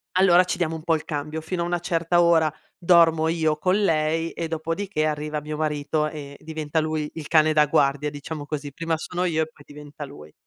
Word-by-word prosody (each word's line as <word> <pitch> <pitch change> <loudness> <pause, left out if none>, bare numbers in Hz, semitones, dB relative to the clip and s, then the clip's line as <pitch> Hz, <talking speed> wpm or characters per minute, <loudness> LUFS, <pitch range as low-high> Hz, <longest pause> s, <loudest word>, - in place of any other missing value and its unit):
allora 185 -1 +6
ci 180 - -3
diamo 165 -2 -1
un 160 - -8
po' 165 -1 +2
il 155 - -5
cambio. 150 +1 -4
Fino 170 +2 -3
a - - -2
una 175 0 -1
certa 170 0 +1
ora 165 -3 +4 0.3
dormo 165 -3 +4
io 160 -2 +1
con 185 +6 +1
lei 165 -2 +1
e 165 - -4
dopodiché 165 +1 -2
arriva 150 0 -2
mio 150 +1 -6
marito 150 0 -1
e 145 -2 -8
diventa 155 0 -2
lui 155 -1 -2
il 155 -2 -7
cane 155 -1 +4
da 150 -1 +5
guardia, 145 -1 +2
diciamo 145 +1 -7
così. 145 -2 -5
Prima 165 +1 -2
sono 180 +3 -3
io 160 -3 +1
e - - -5
poi 145 - -19
diventa 150 +1 -10
lui. 105 - -11
155 Hz, 210 wpm, -24 LUFS, 150-165 Hz, 0.3 s, allora